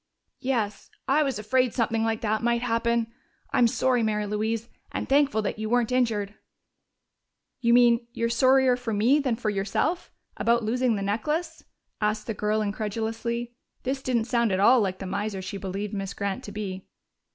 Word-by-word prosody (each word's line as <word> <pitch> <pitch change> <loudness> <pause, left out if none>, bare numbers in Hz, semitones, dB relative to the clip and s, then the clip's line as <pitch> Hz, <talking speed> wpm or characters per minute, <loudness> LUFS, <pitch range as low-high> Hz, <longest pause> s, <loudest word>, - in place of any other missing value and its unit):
"Yes. 230 -6 -2 0.2
I 280 +3 +4
was 270 -6 0
afraid 250 +3 +1
something 225 -2 +1
like 225 -1 -1
that 215 -1 0
might 235 0 +1
happen. 230 -1 0 0.4
I'm 240 - +5
sorry, 250 +1 +1
Mary 210 -1 0
Louise, 220 +2 -2 0.2
and - - -3
thankful 275 -5 +3
that 210 - -3
you 215 0 -3
weren't 245 0 +2
injured." 220 -5 0 1.3
"You 235 -1 +4
mean 235 -1 +4
you're 230 0 -1
sorrier 260 +1 +4
for 245 -2 -4
me 235 +8 +4
than 260 -5 0
for 225 -2 -2
yourself 210 - -1 0.3
about 235 0 +2
losing 240 +1 +1
the 200 - -3
necklace?" 300 - -2 0.4
asked 210 0 0
the 225 - -3
girl 215 +1 0
incredulously. 225 +3 -3 0.3
This 265 +1 -2
didn't 240 -4 0
sound 235 -2 +1
at 190 - +1
all 240 +5 +6
like 190 -2 -1
the 195 - -7
miser 200 +1 -3
she 190 +1 -5
believed 195 +2 -4
Miss 195 -1 -4
Grant 200 -1 -3
to 205 - -7
be. 195 -3 -5
225 Hz, 175 wpm, -26 LUFS, 210-245 Hz, 1.3 s, all